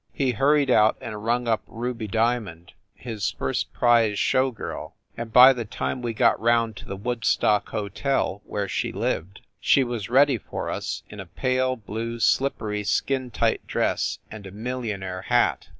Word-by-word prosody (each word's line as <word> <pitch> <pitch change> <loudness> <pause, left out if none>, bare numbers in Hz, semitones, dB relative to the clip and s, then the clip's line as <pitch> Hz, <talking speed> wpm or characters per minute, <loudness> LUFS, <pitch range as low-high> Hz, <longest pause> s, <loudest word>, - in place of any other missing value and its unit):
He 135 -2 +1
hurried 140 +5 +3
out 110 0 +4
and 105 -2 -7
rung 120 +1 0
up 110 -2 +1
Ruby 115 -1 -4
Dia 115 +3 +1
mond, 85 -4 -12 0.2
his 110 -4 -3
first - - -3
prize 115 -4 +3
show 130 +5 +2
girl, 115 - -7 0.2
and 115 -1 -6
by 125 +3 +9
the 120 -2 -4
time 125 +3 -4
we 120 -1 -2
got 115 0 +3
round 115 -1 +2
to - - -10
the 100 - -5
Woodstock 115 -1 +1
Hotel, 105 +1 -2
where 100 -1 -3
she 80 - -2
lived, 95 +5 -3 0.2
she 135 - +4
was 120 -5 -4
ready 135 0 +4
for - - -5
us 100 0 -4
in 105 - -9
a 95 - -7
pale 130 +7 0
blue 115 +1 -5
slippery 110 -5 +1
skin 130 +5 0
tight 110 - -1
dress - - 0
and 105 -2 -9
a - - -10
millionaire 105 -5 -4
hat. - - +1
115 Hz, 170 wpm, -24 LUFS, 105-125 Hz, 0.2 s, by